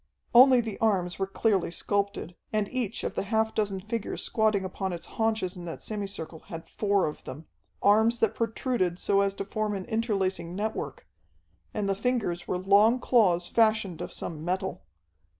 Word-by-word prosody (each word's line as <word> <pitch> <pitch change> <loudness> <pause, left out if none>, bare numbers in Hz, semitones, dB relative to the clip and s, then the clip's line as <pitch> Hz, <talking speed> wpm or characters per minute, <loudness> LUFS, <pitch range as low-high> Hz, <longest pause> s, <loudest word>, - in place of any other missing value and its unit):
Only 255 +1 +8
the 220 -3 -6
arms 190 -5 +1
were 195 - 0
clearly 195 -2 +1
sculptured, 200 +1 -1 0.2
and 215 -2 0
each 250 -6 -2
of - - -2
the - - -1
half 220 +2 0
dozen 200 -3 -1
figures 215 +3 -4
squatting 215 -3 +1
upon 190 0 -3
its 170 - -6
haunches 220 -5 -1
in 175 -1 -8
that 165 - -7
semi 205 -2 -3
circle 160 -4 -7
had 165 -4 -8
four 200 -2 +1
of 150 - -5
them. 150 +5 -8 0.4
Arms 220 +3 +5
that 225 -2 +2
protruded 225 -5 -1
so 200 +1 +2
as 200 0 0
to 195 - -4
form 210 +1 -2
an 190 - -5
interlacing 195 -7 -1
network, 215 +3 -4 0.6
and 210 -2 -2
the 195 - +2
fingers 210 -5 -1
were 180 - 0
long 205 +6 +4
claws 185 -9 +3
fashioned 215 -6 +2
of - - -5
some 155 -2 -6
metal. 185 +2 -2
200 Hz, 175 wpm, -28 LUFS, 185-220 Hz, 0.6 s, Only